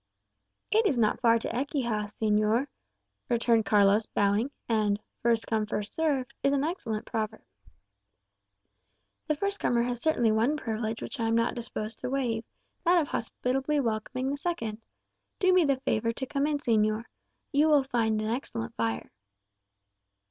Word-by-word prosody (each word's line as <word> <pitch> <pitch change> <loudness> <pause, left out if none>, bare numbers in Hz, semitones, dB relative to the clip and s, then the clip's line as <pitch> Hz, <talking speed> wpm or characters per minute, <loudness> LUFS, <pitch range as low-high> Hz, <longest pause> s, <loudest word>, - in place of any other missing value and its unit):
"It 440 0 +4
is 275 - +1
not 215 -3 +2
far 230 -2 +5
to 230 - -4
Ecija, 240 -5 -1
señor," 215 +3 +1 0.6
returned 230 -2 +2
Carlos, 205 0 +4
bowing. 205 +5 +1 0.2
"And 210 -3 +1 0.2
'First 230 -1 +2
come 220 -1 0
first 205 -1 -3
served,' 275 -5 0
is 275 - +2
an 280 0 +1
excellent 260 - -3
proverb." 220 -1 -3 1.8
"The 305 - +1
first 400 +6 -2
comer 235 -1 +2
has 245 -1 -3
certainly 240 -8 +2
one 230 +8 +2
privilege 225 -4 -3
which 280 - -6
I 225 - +1
am 225 - +2
not 230 +1 +2
disposed 225 -2 -5
to - - -4
waive 245 -4 -1 0.4
that 350 0 +5
of 300 - -1
hospitably 270 +5 -1
welcoming 255 +2 -1
the 285 - -2
second. 230 -10 -3 0.6
Do 370 -1 +3
me 365 -3 +5
the 275 -2 +1
favour 230 -2 0
to 265 - -4
come 280 +2 0
in, 300 -1 +1
señor. 215 -4 +1 0.5
You 295 +2 +4
will 295 -3 +5
find 225 -4 0
an - - -2
excellent 115 - -4
fire." 115 -1 -2
235 Hz, 155 wpm, -28 LUFS, 220-280 Hz, 1.8 s, far